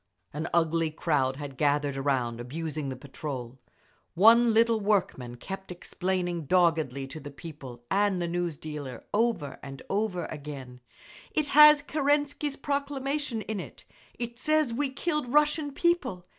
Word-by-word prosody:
An 155 +3 -3
ugly 165 -1 +2
crowd 145 -4 0
had 140 -2 -7
gathered 145 -1 +1
around, 130 -4 -1
abusing 155 +2 -4
the 130 - -4
patrol. 130 -2 -7 0.6
One 230 +5 +7
little 230 0 +4
workman 190 - 0
kept 190 +7 -7
explaining 175 -1 -2
doggedly 160 -6 +2
to 135 +4 -8
the 145 0 -8
people 140 -5 -10
and 200 -1 +2
the 175 - -1
news 170 -2 -2
dealer, 145 -6 -7
over 220 -10 0
and 135 -1 -9
over 195 -3 -1
again, 140 -4 -8 0.5
"It 305 - +1
has 300 0 +8
Kerensky's 290 0 0
proclamation 280 -3 -2
in 220 -2 -4
it. - - -10 0.3
It 235 0 -5
says 310 -3 +2
we 280 +3 0
killed 300 -2 -2
Russian 300 0 +2
people. 275 - 0
175 Hz, 140 wpm, -28 LUFS, -, 0.6 s, has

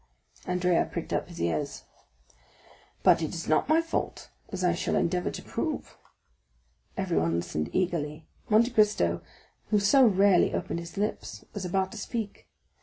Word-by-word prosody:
Andrea 180 -1 +2
pricked - - -4
up - - -1
his - - -10
ears. 85 -2 -2 1.2
"But - - +6
it 160 +2 -3
is 165 - -5
not 155 - +2
my 320 +1 +4
fault, 330 - -3 0.2
as 190 -2 -4
I 175 -1 +3
shall 175 - -1
endeavor 180 +1 +1
to - - -7
prove." - - -4 1.0
Everyone 80 +1 +1
listened 80 -2 -2
eagerly; 160 -4 -1 0.2
Monte 230 +3 +4
Cristo 210 - +2 0.5
who 210 -1 +3
so 260 +7 +5
rarely 195 -2 +4
opened - - -2
his 170 +1 -9
lips, 210 +2 -3
was 205 -3 -4
about 190 +1 0
to 225 - -7
speak. 205 - -5
180 Hz, 150 wpm, -28 LUFS, 155-210 Hz, 1.2 s, But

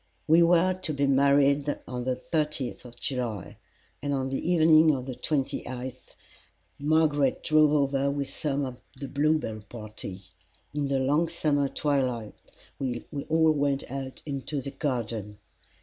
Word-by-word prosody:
We 165 +2 +6
were 175 +2 +4
to 185 -4 -3
be 140 0 +2
married 140 +1 +3
on 125 -1 -4
the 130 -1 0
thirtieth 150 -1 -2
of 120 0 -10
July, 120 -8 -3 0.4
and 145 0 -1
on 135 -1 -1
the 135 +6 -1
evening 160 -2 +6
of 130 -1 -5
the 130 - -4
twenty 140 +1 -1
eighth 130 0 -7 0.6
Margaret 145 -2 +2
drove 155 -1 +5
over 140 -1 +2
with 140 -1 -2
some 140 -1 -1
of 125 -2 -8 0.2
the 140 - -5
Bluebell 145 -6 0
party. 105 -4 -8 0.5
In 145 -1 -1
the 135 0 +1
long 145 +5 +2
summer 145 -4 +1
twilight 130 -7 -1 0.5
we 125 -3 -3 0.2
all 160 0 +4
went 140 -3 -1
out 135 -1 -6
into 140 0 -3
the 135 +1 -5
garden. 115 -8 -3
140 Hz, 150 wpm, -27 LUFS, 130-150 Hz, 0.6 s, We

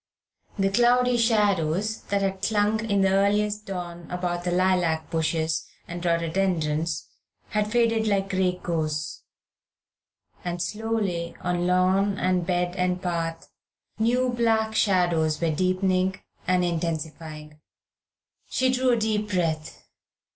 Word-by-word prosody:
The 195 -1 +1
cloudy 245 +3 +4
shadows 210 -3 +1
that 200 0 0
had 190 -1 -2
clung 215 +1 +1
in 200 -1 +3
the 190 0 +3
earliest 210 +2 +1
dawn 175 -3 -6
about 175 -1 -2
the 180 - -1
lilac 180 -3 +1
bushes 160 -1 0 0.2
and 175 0 -6
rhododendrons 170 -2 0 0.4
had 210 -1 -1
faded 230 -2 +2
like 195 -2 +1
grey 185 -1 +1
ghosts, 155 -2 -2 1.2
and 175 0 -3
slowly 205 -5 -2
on 175 0 0
lawn 190 +2 +2
and 180 -2 0
bed 180 -1 0
and 180 0 0
path 165 -2 -3 0.5
new 250 +3 +2
black 225 -2 +1
shadows 175 -7 +2
were 165 -1 +1
deepening 185 +2 +1 0.3
and 180 0 +3
intensifying. 160 -2 -4 0.9
She 260 0 +2
drew 255 0 +1
a - - +2
deep 215 -1 0
breath. 165 -5 -2
185 Hz, 120 wpm, -25 LUFS, 170-210 Hz, 1.2 s, cloudy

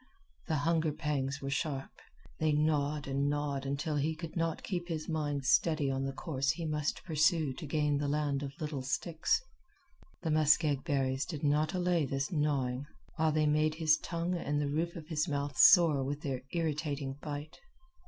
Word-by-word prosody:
The 160 - 0
hunger 160 +1 +1
pangs 145 -2 -2
were 135 - -3
sharp. 140 -2 -2 0.5
They 155 -1 +2
gnawed 150 -1 +1
and 140 +1 0
gnawed 145 -2 -2
until 145 +2 -1
he 155 +3 0
could 165 0 -7
not 165 -2 -1
keep 175 -3 -3
his 160 -3 -4
mind 145 -4 -2
steady 145 +2 +3
on 135 0 -1
the 135 - -2
course 135 -1 -2
he 170 +2 0
must 150 -1 -2
pursue 155 -3 +2
to 155 +4 -8
gain 150 -1 +1
the 145 - -1
land 145 -1 0
of 140 +4 -7
little 150 -4 -3
sticks. 155 +5 0 0.8
The 160 - 0
muskeg 150 -2 +3
berries 135 -3 0
did 155 -4 -6
not 150 +4 +2
allay 175 -4 +1
this 135 +5 -2
gnawing, 140 -4 0 0.3
while 160 0 +3
they 155 0 +2
made 155 +1 +2
his 155 -1 +3
tongue 170 +1 -2
and 145 -4 -1
the 145 -1 0
roof 165 +3 -1
of 160 -2 -8
his 160 0 0
mouth 140 -2 -2
sore 160 -6 +7
with 145 +2 -3
their 135 -5 -3
irritating 150 -4 -2
bite. 150 +2 -6
150 Hz, 180 wpm, -32 LUFS, 140-160 Hz, 0.8 s, sore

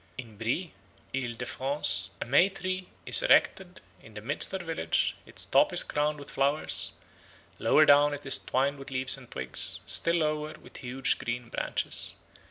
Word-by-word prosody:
In 115 -4 -9
Brie 130 +10 -2 0.4
(Isle 125 -3 -3
de 125 - -6
France) 130 - -1
a - - -4
May 140 +10 +4
tree 185 -1 -4 0.2
is - - +6
erected 190 - +2 0.2
in 110 - -16
the 105 - -7
midst 140 +7 0
of 190 - -4
the - - -11
village; 160 - -1
its - - -4
top - - +3
is - - +4
crowned 150 +1 -1
with 140 - -9
flowers; 140 +3 +1 0.7
lower 155 - +4
down 145 0 +5
it 145 0 -7
is 135 - +4
twined 140 +2 -1
with 135 - -9
leaves 130 0 +1
and 130 -3 -14
twigs, 65 0 -1
still 170 0 +1
lower 155 -1 -1
with - - -12
huge 130 +1 0
green 120 0 -4
branches. - - -1
140 Hz, 180 wpm, -28 LUFS, 125-155 Hz, 0.7 s, is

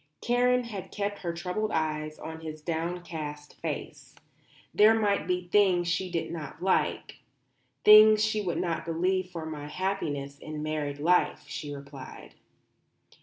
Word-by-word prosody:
Karen 250 +1 +2
had 210 -6 -7
kept 205 0 -3
her 170 - -3
troubled 180 +5 -2
eyes 155 -1 -2
on 160 0 -8
his 155 -1 -7
downcast 160 -3 -4
face. 140 -3 -6 0.6
"There 215 +2 +6
might 205 -2 +1
be 180 -1 -1
things 180 -2 +3
she 180 +2 -1
did 170 -2 -3
not 155 -5 -7
like; 190 +1 0 0.7
things 215 0 +9
she 215 0 0
would 180 -4 -2
not 165 -2 -1
believe 180 +3 0
for 165 -3 -6
my 150 -2 -6
happiness 150 -6 -3
in 155 -1 -6
married 150 -2 -2
life," 175 +5 +2
she 145 -2 -6
replied. 140 -2 -10
170 Hz, 140 wpm, -28 LUFS, 155-195 Hz, 0.7 s, things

